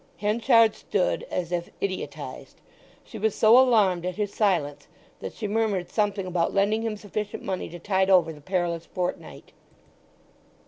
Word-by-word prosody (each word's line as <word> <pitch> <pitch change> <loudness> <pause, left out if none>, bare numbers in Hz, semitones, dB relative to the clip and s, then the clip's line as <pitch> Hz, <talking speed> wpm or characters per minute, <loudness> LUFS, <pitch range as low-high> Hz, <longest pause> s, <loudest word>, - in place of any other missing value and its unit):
Henchard 225 +1 +3
stood 190 -3 -1
as 175 -1 -3
if 175 -1 -2
idiotized. 190 -1 -6 0.4
She 220 - -10
was 220 0 0
so 220 +1 +6
alarmed 215 -9 +4
at 180 0 -3
his 205 0 -3
silence 175 -9 0 0.3
that - - -7
she 215 - -4
murmured 205 -4 -1
something 205 -3 0
about 180 0 -1
lending 205 +3 +2
him 225 -2 -3
sufficient 210 0 -5
money 190 -1 -3
to 175 - -9
tide 190 +2 0
over 180 -4 +4
the 150 - -14
perilous 170 -1 -2
fortnight. 180 -1 -5
195 Hz, 150 wpm, -25 LUFS, 180-215 Hz, 0.4 s, so